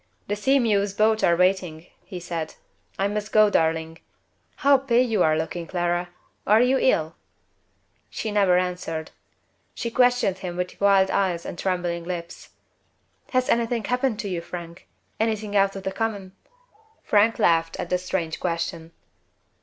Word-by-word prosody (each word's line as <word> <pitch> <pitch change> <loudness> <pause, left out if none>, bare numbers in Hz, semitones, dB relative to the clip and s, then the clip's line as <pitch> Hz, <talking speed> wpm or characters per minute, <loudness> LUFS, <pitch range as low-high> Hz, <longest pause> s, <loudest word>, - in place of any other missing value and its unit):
"The 205 - -1
Sea 265 +7 +2
mew's 205 -5 +1
boats 215 +1 +2
are 170 - +4
waiting," 180 -3 0 0.2
he 185 -3 -8
said. 170 -2 -5 0.4
"I 195 - +1
must 210 +1 -4
go, 215 -1 +5
darling. 160 -1 0 0.6
How 280 -1 +4
pale 255 -2 +2
you 220 -5 0
are 155 -1 +3
looking, 165 +1 -4
Clara! 175 0 -1 0.4
Are 215 +2 +6
you 255 +2 +3
ill?" 160 -9 +1 1.0
She 220 - -4
never 195 -3 +3
answered. 180 -3 -3 0.6
She 235 - -4
questioned 245 -6 +2
him 180 -2 -6
with 180 +2 -4
wild 195 -1 +4
eyes 180 -4 0
and - - -5
trembling 175 -2 -2
lips. 170 -1 -7 0.8
"Has 255 -1 +1
anything 235 -1 +1
happened 250 0 0
to 205 - -5
you, 180 -3 -3
Frank? 170 +1 -9 0.3
anything 215 -2 -1
out 195 0 +3
of 195 - -7
the 190 - -2
common?" 200 -2 -3 0.7
Frank 215 +2 +3
laughed 165 -1 +2
at - - -5
the 180 - +2
strange 180 -3 -3
question. 165 -1 -3
190 Hz, 155 wpm, -24 LUFS, 170-215 Hz, 1.0 s, Are